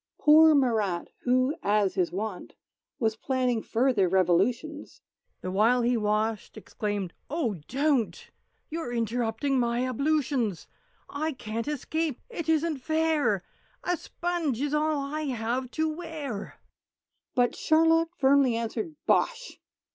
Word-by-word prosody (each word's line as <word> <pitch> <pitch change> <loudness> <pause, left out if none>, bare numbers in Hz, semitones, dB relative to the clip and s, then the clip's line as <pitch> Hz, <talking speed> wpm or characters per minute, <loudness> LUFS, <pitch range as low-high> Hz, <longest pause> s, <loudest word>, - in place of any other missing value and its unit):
Poor 310 +1 +7
Marat, 220 -10 +1 0.2
who 255 +3 +3
(as 205 -1 +2
was - - -22
his 180 -3 0
wont) 200 0 -5 0.4
Was 220 -2 0
planning 250 -1 0
further 230 -6 +2
Revolutions, 195 - 0 0.4
The 185 - -4
while 230 +6 +3
he 245 +1 +2
washed, 215 0 -1
exclaimed, 205 -4 -4 0.2
"Oh, 250 - -2
don't! 265 - 0 0.4
"You're 320 -6 -4
interrupting 235 +3 0
my 240 +1 0
ablutions! 265 - 0 0.4
"I 310 +2 -2
can't 225 0 -5
escape; 300 0 -2
it 335 -8 -4
isn't 320 -1 +2
fair! 310 - +1 0.4
"A 355 - +1
sponge 335 -6 -3
is 290 +1 -1
all 305 0 +1
I 300 +2 -3
have 250 0 -2
to 315 0 +2
wear!" 310 -9 -5 0.8
But 245 -1 +2
Charlotte 325 +1 +3
firmly 270 -4 +4
answered 230 +6 -3
"Bosh!" - - 0
255 Hz, 125 wpm, -27 LUFS, 220-305 Hz, 0.8 s, Poor